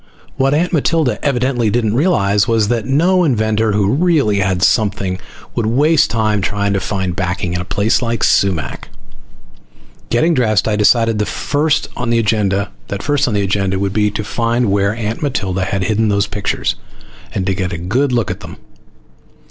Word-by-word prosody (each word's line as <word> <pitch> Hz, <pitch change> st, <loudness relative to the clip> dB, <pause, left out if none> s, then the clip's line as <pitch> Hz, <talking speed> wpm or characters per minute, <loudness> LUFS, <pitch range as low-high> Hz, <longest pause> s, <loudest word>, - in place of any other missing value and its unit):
What 135 Hz, +2 st, +1 dB
Aunt 175 Hz, +4 st, 0 dB
Matilda 155 Hz, -2 st, +1 dB
evidently 125 Hz, -4 st, +1 dB
didn't 110 Hz, -1 st, 0 dB
realize 105 Hz, -, +2 dB
was 110 Hz, -2 st, +1 dB
that 120 Hz, -1 st, -1 dB
no 175 Hz, +7 st, +3 dB
inventor 110 Hz, -6 st, +1 dB
who 100 Hz, 0 st, +1 dB
really 145 Hz, -, +2 dB
had 95 Hz, -2 st, 0 dB
something 100 Hz, -4 st, +1 dB, 0.3 s
would 115 Hz, -, -1 dB
waste 145 Hz, +4 st, +3 dB
time 110 Hz, -2 st, 0 dB
trying 100 Hz, +1 st, -1 dB
to 100 Hz, -, 0 dB
find 95 Hz, -3 st, -3 dB
backing 90 Hz, -1 st, -2 dB
in 90 Hz, -, -2 dB
a -, -, -6 dB
place 100 Hz, +3 st, +1 dB
like 115 Hz, -2 st, -2 dB
Sumac. 95 Hz, -6 st, 0 dB, 1.2 s
Getting 160 Hz, +9 st, +2 dB
dressed, 110 Hz, -8 st, +1 dB
I 110 Hz, -, +1 dB
decided 115 Hz, +1 st, +3 dB
that 105 Hz, -, 0 dB
first 145 Hz, +9 st, 0 dB
on 120 Hz, -1 st, -3 dB
the 115 Hz, -, +2 dB
agenda 105 Hz, -3 st, +1 dB, 1.1 s
would 100 Hz, 0 st, -2 dB
be 105 Hz, 0 st, +2 dB
to 105 Hz, +1 st, -4 dB
find 115 Hz, +2 st, 0 dB
where 100 Hz, +1 st, +1 dB, 0.3 s
Matilda 95 Hz, -10 st, -1 dB
had 95 Hz, 0 st, -2 dB
hidden 110 Hz, +2 st, +1 dB
those 100 Hz, 0 st, +1 dB
pictures, 100 Hz, 0 st, -2 dB, 0.6 s
and 95 Hz, -, -1 dB
get 95 Hz, -1 st, -2 dB
a 85 Hz, -, -4 dB
good 120 Hz, +11 st, 0 dB
look 120 Hz, -4 st, 0 dB
at -, -, -6 dB
them. -, -, -10 dB
110 Hz, 160 wpm, -16 LUFS, 100-125 Hz, 1.2 s, no